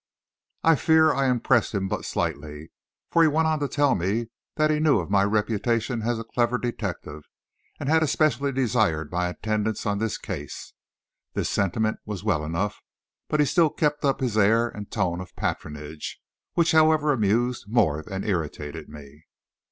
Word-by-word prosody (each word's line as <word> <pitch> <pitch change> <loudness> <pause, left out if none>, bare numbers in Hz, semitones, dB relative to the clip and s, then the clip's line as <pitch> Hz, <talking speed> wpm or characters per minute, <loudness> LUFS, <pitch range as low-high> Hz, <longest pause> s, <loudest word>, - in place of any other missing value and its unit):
I 165 - +6
fear 160 0 +4
I 135 +1 +1
impressed 120 -2 +2
him 95 -1 0
but - - -3
slightly, 75 -1 -4 0.4
for 170 - +4
he 165 - +6
went 160 +2 +2
on 155 -1 +1
to 145 - -1
tell 145 0 +2
me 105 +6 -1 0.3
that 155 0 +2
he 150 - +1
knew 150 -7 +4
of 90 +1 -5
my 100 -1 +4
reputation 110 +3 0
as 120 +1 -1
a 115 - -4
clever 120 +1 0
detective, 95 -11 -5 0.5
and - - -4
had 160 +2 +4
especially 145 -2 +1
desired 110 - 0
my 90 0 0
attendance 110 +3 -2
on 100 -1 0
this 110 -1 -1
case. - - -7 0.6
This - - -1
sentiment 110 +3 0
was 105 -3 -6
well 90 -8 +1
enough, 85 +7 -2 0.5
but 150 - 0
he 150 - +5
still 165 +2 +3
kept 150 0 -1
up 135 -2 +1
his 115 -4 0
air 115 +3 +4
and 105 -2 -8
tone 90 -5 -1
of 95 - -11
patronage, 75 +1 -5 0.4
which 170 -1 +3
however 155 -1 +4
amused 120 +1 0
more 90 -10 +2
than 95 +5 -5
irritated 80 -5 -3
me. 75 +1 -13
110 Hz, 170 wpm, -25 LUFS, 90-135 Hz, 0.6 s, I